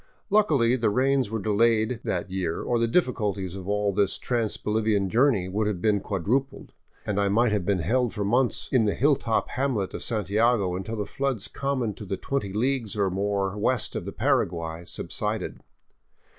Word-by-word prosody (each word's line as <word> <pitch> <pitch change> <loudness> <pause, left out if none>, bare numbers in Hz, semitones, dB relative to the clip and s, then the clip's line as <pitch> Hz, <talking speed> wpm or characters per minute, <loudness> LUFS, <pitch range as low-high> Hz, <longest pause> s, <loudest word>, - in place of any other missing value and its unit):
Luckily, 145 - +4
the 115 -4 +1
rains 130 +1 +2
were 110 - -2
delayed 110 +2 +2
that 90 0 -2
year, 90 -3 -2
or 120 -1 0
the 115 - +2
difficulties 105 - 0
of 95 -1 -8
all 105 -1 +1
this 100 0 +1
trans 115 -3 -1
Bolivian 105 -2 0
journey 120 -7 +3
would 105 +3 -1
have 105 -4 -2
been 105 +2 +2
quadrupled, 120 +9 -2 0.3
and 105 -1 -1
I 100 -1 +2
might 115 +3 +3
have 100 -4 -1
been 100 -2 +2
held 125 +6 +1
for 105 -2 -3
months 120 +4 +1
in 125 -5 +3
the 105 - +1
hilltop 130 -5 +1
hamlet 125 -7 -1
of - - -5
Santiago 105 -2 +1
until 95 +5 -4
the 105 -2 -2
floods 135 -5 -2
common 130 -6 -2
to 105 - -9
the 95 - -2
twenty 135 -8 -2
leagues 120 +1 -1
or 100 -2 +1
more 100 0 -1
west 110 +2 0
of - - -3
the 100 - -4
Paraguay 85 - -1
subsided. - - -3
105 Hz, 180 wpm, -26 LUFS, 100-125 Hz, 0.3 s, Luckily